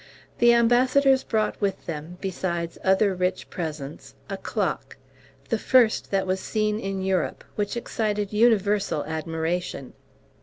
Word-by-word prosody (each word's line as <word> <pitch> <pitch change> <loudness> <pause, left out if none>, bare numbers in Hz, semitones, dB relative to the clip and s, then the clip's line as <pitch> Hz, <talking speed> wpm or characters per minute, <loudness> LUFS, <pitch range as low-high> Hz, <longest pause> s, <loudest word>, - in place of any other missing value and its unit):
The 240 0 +6
ambassadors 255 +3 +4
brought 215 -1 -1
with 200 -1 -1
them, 165 +2 -6
besides 175 -3 -3
other 190 +1 +3
rich 180 0 -2
presents, 155 -4 -6 0.2
a - - -1
clock, - - -3 0.5
the - - +1
first 245 -4 +3
that 195 -1 +1
was 190 0 0
seen 215 +1 -1
in 195 -2 -3
Europe, 190 -3 -1
which 205 +2 -2
excited 210 -3 -2
universal 210 -6 +2
admiration. 160 -1 -3
195 Hz, 125 wpm, -25 LUFS, 175-220 Hz, 0.5 s, The